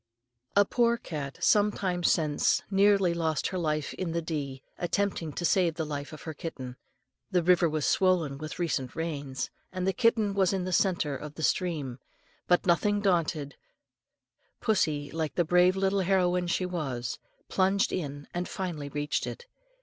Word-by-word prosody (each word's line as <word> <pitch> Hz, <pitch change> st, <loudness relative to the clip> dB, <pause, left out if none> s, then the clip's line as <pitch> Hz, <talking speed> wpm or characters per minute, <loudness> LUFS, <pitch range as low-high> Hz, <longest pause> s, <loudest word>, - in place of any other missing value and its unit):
A 205 Hz, 0 st, +6 dB
poor 235 Hz, +2 st, +2 dB
cat 145 Hz, -9 st, -6 dB
some 210 Hz, 0 st, +4 dB
time 180 Hz, -3 st, -2 dB
since 155 Hz, -3 st, +2 dB
nearly 195 Hz, -2 st, +4 dB
lost 160 Hz, -3 st, 0 dB
her 185 Hz, -, -3 dB
life 155 Hz, -3 st, -1 dB
in 175 Hz, -3 st, -3 dB
the 170 Hz, -, 0 dB
Dee, 140 Hz, -5 st, -4 dB, 0.2 s
attempting 180 Hz, -3 st, -1 dB
to 175 Hz, -, -3 dB
save 170 Hz, -2 st, +3 dB
the 160 Hz, -1 st, -2 dB
life 145 Hz, -1 st, -5 dB
of 155 Hz, -2 st, -10 dB
her 160 Hz, -, -5 dB
kitten. 130 Hz, -5 st, -6 dB, 0.5 s
The 180 Hz, -3 st, +2 dB
river 175 Hz, -1 st, +4 dB
was 155 Hz, -1 st, -1 dB
swollen 170 Hz, -7 st, +2 dB
with 155 Hz, 0 st, -6 dB
recent 150 Hz, -7 st, -2 dB
rains, 145 Hz, -5 st, -3 dB, 0.2 s
and 185 Hz, -1 st, -3 dB
the 190 Hz, -, +2 dB
kitten 230 Hz, -3 st, +2 dB
was 195 Hz, -1 st, +2 dB
in 190 Hz, -2 st, -1 dB
the 185 Hz, 0 st, -3 dB
centre 170 Hz, -7 st, +1 dB
of 150 Hz, +2 st, -8 dB
the 160 Hz, -, -6 dB
stream; 150 Hz, -10 st, -1 dB, 0.5 s
but, 180 Hz, -, +3 dB
nothing 200 Hz, +4 st, +3 dB
daunted, 165 Hz, -7 st, 0 dB, 1.0 s
pussy, 155 Hz, -9 st, 0 dB
like 160 Hz, -2 st, -3 dB
the 175 Hz, -, +2 dB
brave 180 Hz, +2 st, +4 dB
little 195 Hz, 0 st, +1 dB
heroine 180 Hz, -1 st, +2 dB
she 185 Hz, +1 st, 0 dB
was, 135 Hz, -9 st, -3 dB, 0.3 s
plunged 195 Hz, +1 st, +2 dB
in, 145 Hz, -4 st, -4 dB
and 175 Hz, +1 st, -3 dB
finally 165 Hz, -7 st, -4 dB
reached 145 Hz, +1 st, -2 dB
it. 480 Hz, -, -7 dB
170 Hz, 165 wpm, -29 LUFS, 150-190 Hz, 1.0 s, A